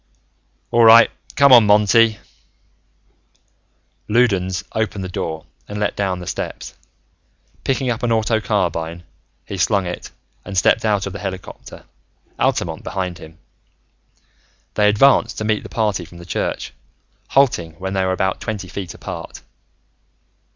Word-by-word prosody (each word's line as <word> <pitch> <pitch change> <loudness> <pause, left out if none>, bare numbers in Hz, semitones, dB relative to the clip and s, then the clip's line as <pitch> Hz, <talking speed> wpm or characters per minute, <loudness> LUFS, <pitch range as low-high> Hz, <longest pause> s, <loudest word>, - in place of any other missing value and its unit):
"All 120 - +4
right, 115 +1 +8 0.2
come 140 -1 +6
on, 115 -4 +8
Monty." 105 +2 +4 1.9
Loudons 95 -5 +1
opened 110 -3 -2
the - - -4
door 80 -3 -4 0.2
and 105 0 -6
let 105 - -1
down 95 -2 -1
the 90 - -8
steps. - - -5 0.9
Picking 130 -1 0
up 115 - -3
an 120 - 0
auto 110 0 +1
carbine, 85 -5 -2 0.4
he 100 - -6
slung 100 +1 +2
it 90 0 -6 0.3
and 100 - -6
stepped 90 - +3
out 105 -3 +1
of 100 - -5
the - - -6
helicopter, 95 -2 -8 0.5
Altamont - - 0
behind 90 -3 -4
him. 80 0 -13 1.4
They 105 -1 +3
advanced 115 +1 +3
to - - -3
meet 110 -1 0
the - - -10
party 105 -5 -1
from 85 +1 -14
the 85 - -11
church, 80 - -3 0.5
halting 120 - +2
when 95 +4 -5
they 95 -1 +1
were 95 - 0
about 95 0 -1
twenty 105 -4 -4
feet 95 -1 -6
apart. - - -8
100 Hz, 140 wpm, -20 LUFS, 90-110 Hz, 1.9 s, right